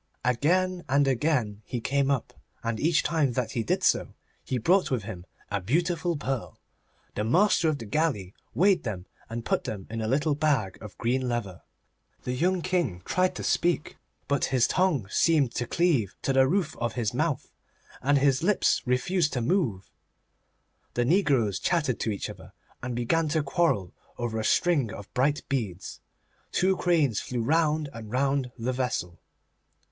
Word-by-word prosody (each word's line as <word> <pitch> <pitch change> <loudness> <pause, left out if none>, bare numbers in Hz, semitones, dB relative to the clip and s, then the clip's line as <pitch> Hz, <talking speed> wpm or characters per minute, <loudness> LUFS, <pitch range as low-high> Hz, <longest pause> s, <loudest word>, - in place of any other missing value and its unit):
Again 175 +9 +1
and 140 +1 +3
again 125 -6 0
he 120 +3 -4
came 140 +3 0
up, 140 -5 -1 0.3
and 115 -1 -2
each 165 +3 +2
time 150 -5 +1
that 125 -1 -1
he 120 - -1
did 110 - -1
so - - +2 0.3
he 130 - -2
brought 180 - +3
with 125 -6 -1
him 95 -3 -8 0.2
a 100 -1 -1
beautiful 170 - 0
pearl. 135 -4 -4 0.6
The 105 - -2
master 170 - +3
of 155 - 0
the 115 - -8
galley 105 - -1 0.2
weighed 185 -1 +4
them, 95 -6 -5 0.2
and 115 0 -5
put - - 0
them 100 -3 -5
into 115 -1 -2
a - - -2
little 145 +4 +2
bag 140 -10 0
of 105 -3 -10
green 125 +2 0
leather. 105 -7 -3 0.6
The 125 - -3
young 175 +7 +1
King 170 - -1
tried 185 0 +1
to - - -5
speak, 175 -3 0 0.3
but 140 -1 +1
his 130 -2 +2
tongue 170 - +1
seemed 150 -7 +3
to 120 0 -2
cleave 145 - +1
to 135 - +1
the 130 0 +5
roof 175 0 0
of 120 -1 -2
his 120 -3 -1
mouth, 150 +1 -1 0.5
and 145 +2 +3
his 140 0 +3
lips 195 +4 +2
refused 150 +6 +1
to 125 - 0
move. 115 - 0 1.0
The 120 - +1
negroes 135 - +2
chattered 150 -9 0
to - - -1
each 100 - -3
other, - - -11 0.3
and 125 -1 -4
began 155 +7 +1
to 155 0 +1
quarrel 135 - 0 0.2
over 115 -2 -2
a - - -2
string 150 - +2
of 100 -2 -10
bright 145 +4 +1
beads. 105 -9 -3 0.5
Two 190 +1 +2
cranes 155 - +2
flew 120 -2 -3
round 155 +2 +2
and 115 -2 -8
round 135 0 0
the 125 +2 -2
vessel. 125 -9 -2
135 Hz, 170 wpm, -27 LUFS, 115-160 Hz, 1.0 s, the